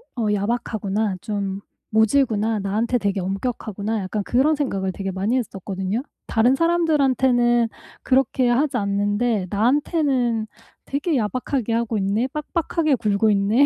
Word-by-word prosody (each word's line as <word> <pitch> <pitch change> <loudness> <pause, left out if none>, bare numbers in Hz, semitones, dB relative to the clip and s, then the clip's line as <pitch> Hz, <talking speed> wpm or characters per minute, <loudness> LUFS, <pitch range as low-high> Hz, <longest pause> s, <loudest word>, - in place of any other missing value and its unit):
어 235 -3 -1
야박하구나, 210 -1 -1
좀 200 -2 -3 0.3
모질구나, 220 -1 +2
나한테 215 +5 0
되게 200 -2 -1
엄격하구나.' 210 +1 -3
약간 200 +2 -3
그런 275 +8 +2
생각을 195 -10 -1
되게 195 0 -4
많이 200 +7 0
했었거든요. 195 -1 -3 0.2
'다른 240 +4 +3
사람들한테는 265 -8 +3 0.3
그렇게 260 -1 +2
하지 270 +4 +1
않는데 205 +1 0
나한테는 245 - +1 0.4
되게 290 +2 -1
야박하게 245 +1 -1
하고 230 -2 0
있네, 200 +5 +1
빡빡하게 310 0 0
굴고 215 -1 +1
있네.' 210 +6 +4
225 Hz, 330 characters per minute, -22 LUFS, 200-260 Hz, 0.4 s, 있네